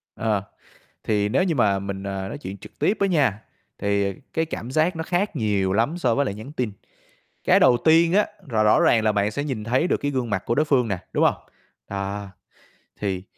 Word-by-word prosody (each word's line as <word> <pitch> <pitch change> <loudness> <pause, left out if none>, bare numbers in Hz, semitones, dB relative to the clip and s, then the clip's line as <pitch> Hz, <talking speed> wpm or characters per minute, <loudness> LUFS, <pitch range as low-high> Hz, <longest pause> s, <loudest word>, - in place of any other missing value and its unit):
Ờ, 105 -3 0 0.6
thì 105 -1 +1
nếu 135 - +2
như 170 -4 0
mà 100 -6 +2
mình, 100 0 -5
ờ, 95 -1 -4
nói - - -6
chuyện 100 -8 -7
trực - - -14
tiếp 210 - +2
á 200 - +3
nha, 135 - +1 0.4
thì 100 -1 0 0.2
cái 160 - +1
cảm 125 -6 -6
giác 160 +5 +1
nó 160 - -2
khác 175 +2 -1
nhiều 100 -6 +1
lắm 120 - +1
so 125 -7 +2
với 140 +3 +2
lại 100 - -3
nhắn 110 +7 -9
tin. 125 -7 -2 0.7
Cái - - +5
đầu 120 - +6
tiên 165 +2 +5
á, 210 +2 +4 0.2
là 110 -3 +1
rõ 105 - +4
ràng 110 -2 +4
là 110 - +3
bạn 100 0 +1
sẽ 145 +6 -3
nhìn 130 -8 -4
thấy 125 +8 +1
được - - +1
cái 145 - -2
gương 125 -4 -2
mặt 95 -2 -1
của 120 - +1
đối 150 - +2
phương 130 -6 +2
nè, 100 -3 -1
đúng - - +2
hông? - - +4 0.5
À, 100 +1 -4 0.7
thì 95 -2 -2
115 Hz, 225 wpm, -23 LUFS, 100-150 Hz, 0.7 s, đầu